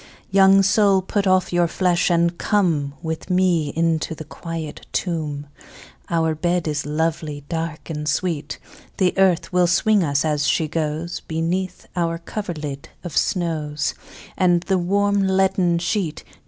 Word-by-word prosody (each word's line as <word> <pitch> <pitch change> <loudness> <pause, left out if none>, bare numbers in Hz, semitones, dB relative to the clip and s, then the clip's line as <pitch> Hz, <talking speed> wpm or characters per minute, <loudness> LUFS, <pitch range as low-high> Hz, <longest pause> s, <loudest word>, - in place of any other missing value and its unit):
II. - - -19 0.2
Young 195 0 +6
soul 200 -1 +4
put 200 +1 -1
off 185 -1 +2
your 175 -1 +3
flesh, 180 +1 +1
and 170 0 +2
come 160 -9 +1
With 160 +2 -4
me 180 -4 +2
into 165 -1 0
the 155 - -7
quiet 165 -1 -7
tomb, 155 -5 -2 0.6
Our 160 -2 +1
bed 175 +1 -1
is 150 -1 -2
lovely, 150 -1 -2
dark, 165 -1 -4
and 150 -1 -3
sweet; 150 -1 -2 0.4
The 185 -2 +2
earth 185 -2 +2
will 180 -1 +4
swing 200 +3 +3
us, 140 -1 +1
as 150 -2 +1
she 160 - +2
goes, 160 +2 -3
Beneath 175 +3 -3
our 165 -2 0
coverlid 155 -6 -6
of 175 -5 -6
snows, 155 -5 0 0.4
And 175 -2 +3
the 190 -1 +1
warm 200 +3 +1
leaden 190 -2 +2
sheet. 175 -1 -2
170 Hz, 145 wpm, -22 LUFS, 155-185 Hz, 0.6 s, Young